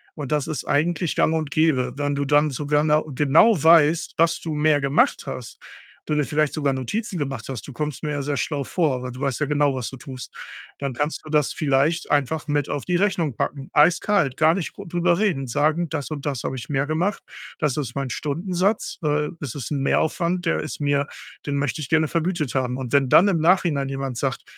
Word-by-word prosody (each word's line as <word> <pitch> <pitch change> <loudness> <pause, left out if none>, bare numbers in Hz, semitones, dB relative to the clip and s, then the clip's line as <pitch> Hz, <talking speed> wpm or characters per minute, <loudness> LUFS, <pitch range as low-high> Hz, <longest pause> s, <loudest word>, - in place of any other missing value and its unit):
und 145 -2 -6
das 150 -2 0
ist 155 - -4
eigentlich 165 +3 0
gang 160 - +2
und 155 -2 -2
gäbe. 130 -6 +2
Wenn 145 0 -1
du 140 0 -1
dann 150 +2 +3
sogar 145 +2 0
nau 155 0 +3
genau 150 - +4
weißt, 165 0 +4
dass 165 0 +3
du 160 -2 -4
mehr 150 -1 +3
gemacht 140 +1 +2
hast, 125 -3 -7 0.5
du 150 - -2
dir 150 - +2
vielleicht 150 +3 0
sogar 140 -3 0
Notizen 185 - -3
gemacht 135 -6 -4
hast- 125 -6 -5
du 140 - -8
kommst 150 0 -4
mir 150 - -2
ja 145 -1 -2
sehr 145 +1 -2
schlau 145 0 -2
vor, 145 -7 0
weil 125 - -5
du 130 - -9
weißt 135 -1 -1
ja 150 - +1
genau, 145 -1 +2
was 125 -3 -4
du - - -9
tust- 130 -1 -10 0.4
dann 140 -2 -3
kannst 145 +5 -2
du - - -9
das 150 -2 +1
vielleicht 145 +3 +1
einfach 145 +2 0
mit 145 -1 0
auf 145 - -3
die 180 -1 +1
Rechnung 175 - 0
packen, 140 -1 -3
eiskalt, 165 -1 +3
gar 160 +1 +5
nicht 180 -4 -4
gr - - -10
drüber 175 0 +1
reden, 175 -10 0
sagen 155 +7 +1
„Das 150 -1 -4
und 145 -2 -5
das 135 -5 -3
habe 130 - -3
ich 120 - -7
mehr 135 -1 0
gemacht. 175 +6 -1 0.3
Das 150 -5 0
ist 130 -4 -4
mein 135 -2 -2
Stundensatz. 180 - -1
Äh, 150 -1 0
das 140 -5 -6
ist 135 -2 -6
'n 140 -2 -1
Mehraufwand, 170 +5 0
der 165 - +1
ist 155 - -5
mir 145 0 +1 0.4
den 140 - -1
möchte 145 +1 -1
ich 135 - -6
gerne 160 -1 +2
vergütet 165 -4 -1
haben.“ 125 -2 -1
Und 130 -3 -5
wenn 140 -1 +4
dann 195 +9 +6
im 175 -4 +1
Nachhinein 160 -4 +2
jemand 135 -2 -4
sagt: - - -2
150 Hz, 220 wpm, -23 LUFS, 135-160 Hz, 0.5 s, dann